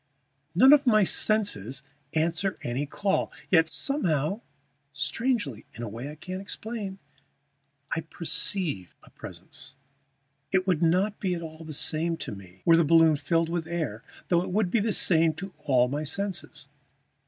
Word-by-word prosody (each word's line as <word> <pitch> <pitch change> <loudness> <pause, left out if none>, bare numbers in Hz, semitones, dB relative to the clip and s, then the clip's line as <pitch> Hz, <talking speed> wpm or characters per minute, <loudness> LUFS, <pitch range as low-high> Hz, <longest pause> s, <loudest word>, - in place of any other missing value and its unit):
None 260 - +8
of 285 -2 +4
my 215 -3 +5
senses 135 - +2 0.3
answer 170 +4 0
any 130 +4 -2
call; 195 +6 -1 0.2
yet 165 -3 +5
somehow, 175 - 0 0.5
strangely, 160 - -2
in 120 - -6
a - - -3
way 115 +6 -6
I 150 - -8
can't 185 +4 -6
explain, 205 -1 -6 1.0
I 165 - -1
perceive 160 - 0
a - - -17
presence. 130 - -10 0.8
It 185 -1 +2
would 180 -4 +1
not 185 +5 +2
be 185 -3 -1
at 170 - -6
all 160 0 -9
the 160 - -8
same 160 +3 0
to 135 - -6
me 95 -2 -12
were 165 -1 +6
the 170 - +4
balloon 165 0 +5
filled 165 +3 0
with 170 -1 -2
air, 155 -10 -3 0.3
though 175 -1 +3
it - - -4
would 195 -2 +1
be 235 - +3
the 215 +2 0
same 165 -5 +3
to 195 +3 -8
all 125 -3 +4
my 145 +4 -3
senses. 190 +5 -4
165 Hz, 160 wpm, -27 LUFS, 150-195 Hz, 1.0 s, None